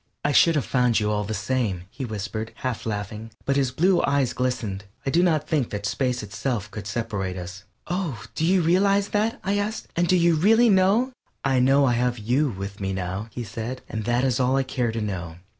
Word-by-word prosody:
"I 145 - +3
should 165 +3 +5
have 145 - +1
found 125 -3 +2
you 105 -1 0
all 105 0 0
the 110 +2 -3
same," 105 -4 -1
he 135 - -5
whispered, 110 0 -4
half 120 -3 -2
laughing, 105 +1 -4 0.2
but 140 - +1
his 135 -2 +2
blue 175 +8 +3
eyes 140 -3 +1
glistened. 110 -6 -2 0.2
"I 135 - 0
do 170 - +4
not 155 -4 +2
think 150 -7 0
that 105 0 -4
space 125 +2 -1
itself 105 0 -3
could 105 -2 -7
separate 100 -4 -3
us." 90 +3 -8 0.2
"Oh, 165 - -3
do - - -2
you 180 +1 +3
realize 195 +4 +3
that?" 215 +2 0
I 200 +2 +1
asked, 215 +2 -3
"and 175 +1 +2
do 185 - +4
you 170 -1 +4
really 225 +9 +5
know?" 200 +6 +3 0.3
"I 135 -2 +3
know 135 +2 +4
I 125 - +3
have 125 +1 +1
you 125 +7 +1
with 100 -1 -6
me 95 0 -1
now," 95 +3 -3
he 120 +2 -5
said, 115 +4 -6
"and 110 -1 -4
that 120 +2 +1
is 130 -2 +1
all 130 +1 +2
I 135 - +2
care 125 -3 -1
to 115 0 -3
know." 90 -6 -4
125 Hz, 220 wpm, -24 LUFS, 105-155 Hz, 0.3 s, should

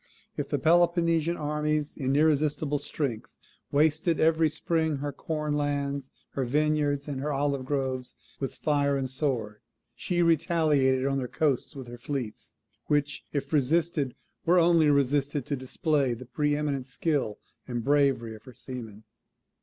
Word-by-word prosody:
If - - -3
the - - +1
Peloponnesian 170 0 +3
armies 150 0 -1
in 135 -1 0
irresistible 150 -1 +2
strength 135 -6 -3 0.4
wasted 155 +3 +2
every 160 0 +4
spring 160 0 0
her 145 +1 -4
corn 150 -2 -3
lands, 140 -2 -1 0.2
her 135 - -2
vineyards, 145 +1 +1
and 140 -2 -3
her 150 +2 -1
olive 140 -1 0
groves 130 -2 -2 0.2
with 135 - -3
fire 140 -2 +1
and 135 -1 -1
sword, 125 -6 -2 0.4
she 175 -1 0
retaliated 155 -6 +3
on 135 0 +1
their 125 - -3
coasts 145 -2 0
with 135 -2 -7
her 120 0 -10
fleets; 125 -4 -5 0.3
which, 145 -1 0
if 140 +1 -3
resisted, 150 -1 +1 0.3
were 175 +2 +4
only 170 -3 +5
resisted 140 0 +1
to 145 - -1
display 135 0 0
the 130 +2 -10
pre 145 +4 0
eminent 140 -3 -2
skill 135 -5 -1 0.3
and 120 -2 -3
bravery 135 -4 +2
of 110 - -12
her 130 -3 -12
seamen. 115 -5 -8
145 Hz, 145 wpm, -28 LUFS, 130-155 Hz, 0.4 s, only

